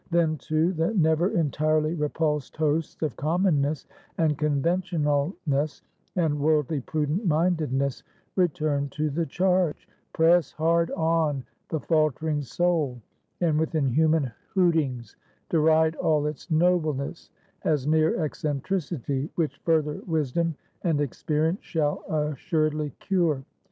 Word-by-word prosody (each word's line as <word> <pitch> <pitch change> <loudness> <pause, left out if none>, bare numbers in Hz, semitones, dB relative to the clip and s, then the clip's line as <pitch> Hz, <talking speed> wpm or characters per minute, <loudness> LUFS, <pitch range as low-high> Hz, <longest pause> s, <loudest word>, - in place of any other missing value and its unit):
Then, 165 -2 +2
too, 155 +7 +1
the 165 +6 0
never 160 0 +3
entirely 155 -1 +1
repulsed 150 -2 -1
hosts 155 +1 -1
of 150 - -1
Commonness, 155 -3 +1 0.3
and 155 -2 +2
Conventionalness, 150 -1 0 0.3
and 160 -4 +1
Worldly 150 0 +2
Prudent 155 - -1
mindedness 155 -5 +1 0.3
return 150 -5 +1
to 150 +1 -2
the 165 +3 -1
charge; 180 +1 +1 0.2
press 165 0 +3
hard 165 +1 +2
on 160 -4 +1 0.3
the 160 - -1
faltering 155 -1 +1
soul; 150 -3 0 0.4
and 160 -3 +2
with 160 +1 -1
inhuman 155 0 +2 0.2
hootings 160 -10 +1 0.3
deride 160 0 +4
all 150 -2 +2
its 150 +3 -5
nobleness 160 -3 0 0.3
as 150 -4 +1
mere 155 +2 +2
eccentricity, 145 -1 -2
which 150 -4 -1
further 155 -3 +1
wisdom 160 0 0 0.3
and 165 -4 +1
experience 155 - -1
shall 150 -3 -1
assuredly 155 0 0
cure. 170 -8 +1
155 Hz, 110 wpm, -26 LUFS, 145-165 Hz, 0.4 s, deride